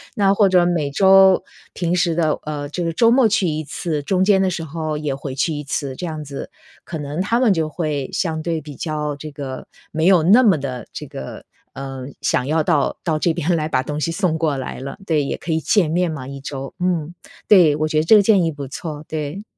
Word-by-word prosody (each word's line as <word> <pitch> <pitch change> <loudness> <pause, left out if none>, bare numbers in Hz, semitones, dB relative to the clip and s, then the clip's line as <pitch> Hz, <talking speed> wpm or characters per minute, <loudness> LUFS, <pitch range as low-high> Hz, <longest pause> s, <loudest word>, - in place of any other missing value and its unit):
那 195 -2 +3
或 200 -1 +4
者 180 -2 +4
每 165 -5 0
周 190 +3 +6 0.3
平 175 0 -1
时 175 -1 +1
的 160 -2 +1
呃， 145 -1 -4
这 175 +5 -4
个 165 - -1
周 230 +8 +4
末 250 +1 +5
去 195 -3 +1
1 155 -1 -2
次， 155 +1 -3
中 185 +5 0
间 195 -1 +4
的 190 - +2
时 170 -2 -4
候 155 0 -4
也 150 -2 -2
回 135 0 -6
去 145 +4 0
1 150 0 -4
次， 140 -1 -3
这 180 - -5
样 155 -3 -5
子， 140 -1 -7 0.3
可 165 - -6
能 145 +3 -4
他 230 +5 +1
们 240 -5 +4
就 160 -3 -1
会 150 -4 -3
相 160 -4 -1
对 165 0 -2
比 150 -2 -10
较 150 -2 -3
这 150 +2 -8
个 135 -2 -7 0.3
没 160 +1 0
有 185 -4 +5
那 205 +10 +6
么 205 -9 +4
地 130 -4 -5
这 - - -7
个， 65 - -8 0.3
呃， 135 -1 -7
想 125 0 0
要 155 +2 +1
到 150 -3 +1
到 160 -3 0
这 170 - +2
边 170 +1 0
来 155 -2 -1
把 130 -4 +1
东 150 +1 -4
西 165 - 0
送 170 -2 0
过 155 -4 0
来 130 - -5
了。 135 +1 -7
对， 155 -5 +1
也 140 - -3
可 170 - -5
以 160 - +1
见 170 0 +2
面 175 +1 +1
嘛， 140 -5 -6
1 140 0 -7
周。 135 -1 -6
嗯， 175 -3 -1 0.3
对， 175 -8 +6
我 155 +1 0
觉 155 0 +1
得 - - +1
这 190 +7 +6
个 205 - +6
建 200 -3 +4
议 165 - 0
不 145 -2 -7
错， 150 +2 -7
对。 155 +5 -5
155 Hz, 250 characters per minute, -20 LUFS, 145-180 Hz, 0.3 s, 周